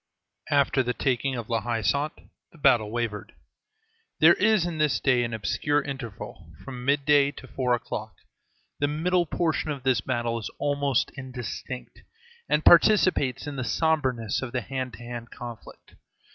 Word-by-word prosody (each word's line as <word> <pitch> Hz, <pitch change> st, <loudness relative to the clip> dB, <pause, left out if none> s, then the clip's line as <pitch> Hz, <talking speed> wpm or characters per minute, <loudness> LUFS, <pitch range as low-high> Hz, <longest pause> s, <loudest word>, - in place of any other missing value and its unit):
After 140 Hz, -2 st, +3 dB
the 125 Hz, -1 st, -2 dB
taking 130 Hz, 0 st, 0 dB
of 115 Hz, -3 st, -5 dB
La 115 Hz, -2 st, 0 dB
Haie 115 Hz, -2 st, -2 dB
Sainte 145 Hz, -, 0 dB, 0.3 s
the -, -, -18 dB
battle 120 Hz, -7 st, +4 dB
wavered. 115 Hz, -2 st, -3 dB, 0.9 s
There 160 Hz, +2 st, +8 dB
is 210 Hz, -2 st, +3 dB
in 170 Hz, -3 st, -4 dB
this 150 Hz, -5 st, +2 dB
day 125 Hz, -2 st, +3 dB
an 115 Hz, -, -3 dB
obscure 145 Hz, +6 st, 0 dB
interval, 135 Hz, -7 st, -7 dB, 0.2 s
from 125 Hz, -2 st, -7 dB
midday 140 Hz, +1 st, +3 dB
to 130 Hz, -, -11 dB
four 125 Hz, -2 st, 0 dB
o'clock; 110 Hz, -4 st, -6 dB, 0.6 s
the 145 Hz, -, +2 dB
middle 170 Hz, +4 st, +1 dB
portion 160 Hz, -1 st, -1 dB
of 140 Hz, -4 st, -4 dB
this 130 Hz, -5 st, +2 dB
battle 115 Hz, 0 st, -1 dB
is 110 Hz, -, -5 dB
almost 145 Hz, -2 st, 0 dB
indistinct, 130 Hz, -1 st, -7 dB, 0.5 s
and 150 Hz, -, +1 dB
participates 170 Hz, -, +5 dB
in 145 Hz, -1 st, -5 dB
the 130 Hz, -, -2 dB
sombreness 130 Hz, -8 st, 0 dB
of 130 Hz, -3 st, -6 dB
the 125 Hz, -, 0 dB
hand 130 Hz, +1 st, -4 dB
to 120 Hz, -, -11 dB
hand 120 Hz, 0 st, -7 dB
conflict. 120 Hz, -2 st, -10 dB
130 Hz, 160 wpm, -26 LUFS, 120-145 Hz, 0.9 s, There